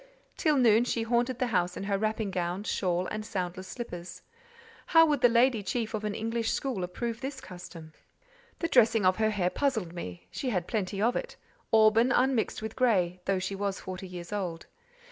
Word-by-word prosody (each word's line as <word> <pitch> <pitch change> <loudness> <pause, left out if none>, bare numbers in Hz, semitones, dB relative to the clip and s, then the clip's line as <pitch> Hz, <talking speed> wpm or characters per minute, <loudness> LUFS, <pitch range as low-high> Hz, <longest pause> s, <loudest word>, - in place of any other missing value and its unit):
Till 305 -3 +2
noon, 230 -3 +5
she 235 -2 -1
haunted 240 +2 +1
the 255 - +1
house 180 -1 +1
in - - -4
her 200 0 0
wrapping 215 0 -1
gown, 180 +2 -2
shawl, 180 -4 0
and 215 0 -3
soundless 185 -2 -4
slippers. 180 -7 -7 0.6
How 325 -1 +7
would 295 -4 +1
the 245 - +7
lady 235 -1 +3
chief 225 +3 -2
of 215 -1 -3
an 210 -1 -2
English 225 0 -1
school 255 -9 -2
approve 230 +6 -4
this 270 0 -5
custom? 175 -5 -10 0.6
The 335 - -1
dressing 225 - +4
of 185 0 +4
her 220 0 +2
hair 185 -4 0
puzzled 220 -12 -1
me; 90 - -7
she 260 - -3
had 180 -7 -1
plenty 200 -2 -2
of 240 +2 +2
it: - - -4 0.4
auburn, 225 +2 +5
unmixed 250 -3 +1
with 220 0 -5
grey: 185 -8 +2
though 195 -1 +1
she 185 +2 -3
was 195 0 -2
forty 185 +1 -7
years 175 +1 -8
old. 175 -5 -3
215 Hz, 190 wpm, -29 LUFS, 185-240 Hz, 0.6 s, How